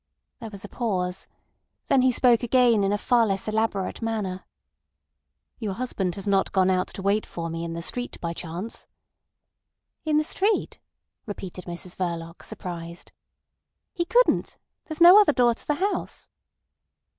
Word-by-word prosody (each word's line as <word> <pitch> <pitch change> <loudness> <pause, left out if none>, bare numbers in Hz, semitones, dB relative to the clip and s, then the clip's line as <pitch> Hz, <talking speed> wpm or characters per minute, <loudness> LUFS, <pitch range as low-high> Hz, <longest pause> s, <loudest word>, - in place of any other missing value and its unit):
There 225 -3 -7
was 200 -1 -9
a - - -7
pause. 185 -6 -2 0.6
Then 270 - +3
he 255 0 +4
spoke 245 -1 +4
again, 240 -3 +4
in 195 - +1
a 205 - +1
far 235 +1 +3
less 195 0 -2
elaborate 215 -3 -1
manner. 210 -5 -3 1.1
"Your 215 -4 -3
husband 195 -7 -2
has 195 0 -7
not 195 -1 +2
gone 190 -1 +3
out 185 0 +1
to 190 - -6
wait 200 +2 +2
for 165 -1 -6
me 165 0 -4
in 165 0 -4
the 170 0 -5
street 245 +7 -4
by 170 -1 -3
chance?" 175 +6 -7 1.2
"In 310 -1 +1
the 305 - +3
street!" 400 +7 -1 0.5
repeated 190 -3 -7
Mrs 175 +1 -7
Verloc, 170 -2 -4
surprised. 170 -1 -8 0.8
"He 345 -3 -1
couldn't. - - +2 0.3
There's 310 0 -7
no 360 +5 +10
other 350 -8 +3
door 245 -3 +4
to - - -14
the 295 - +1
house." 395 +6 -2
205 Hz, 155 wpm, -25 LUFS, 180-245 Hz, 1.2 s, no